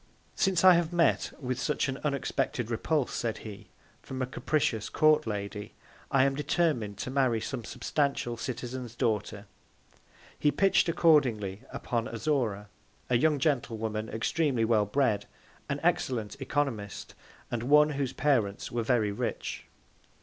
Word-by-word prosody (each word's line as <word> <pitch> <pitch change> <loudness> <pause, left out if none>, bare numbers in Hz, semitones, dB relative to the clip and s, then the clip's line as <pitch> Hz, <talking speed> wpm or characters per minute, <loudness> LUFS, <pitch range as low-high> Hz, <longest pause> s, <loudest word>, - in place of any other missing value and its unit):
Since 190 -3 +1
I 185 -1 +9
have 170 -1 +1
met 170 -1 +2
with 130 -3 -3
such 150 +1 0
an 135 0 -3
unexpected 135 -4 -1
Repulse, 145 +4 0
said 115 -2 -2
he, 105 -1 -9 0.3
from 130 - -7
a 130 - 0
capricious 130 -4 -1
Court 155 -5 +3
Lady, 105 -1 -5 0.3
I 135 -1 +4
am 135 0 +2
determin'd 140 - 0
to 125 - -4
marry 130 -4 +2
some 120 +2 -4
substantial 125 -1 -1
Citizen's 120 0 -5
Daughter. 105 -4 -1 0.9
He 150 - +3
pitch'd 195 -1 +3
accordingly 125 - +3
upon 115 -2 -2
Azora, 115 -5 -1 0.4
a - - +4
young 150 +4 +3
Gentlewoman 110 -6 -1
extremely 125 0 0
well 110 -2 +2
bred, 105 -3 +1 0.4
an - - -1
excellent 110 -5 0
Oeconomist, 130 - -2 0.4
and 120 - -1
one, 150 +4 +5
whose 140 -3 -2
Parents 120 -9 0
were 120 - -1
very 115 -3 +1
rich. 100 - -4
125 Hz, 135 wpm, -29 LUFS, 110-145 Hz, 0.9 s, I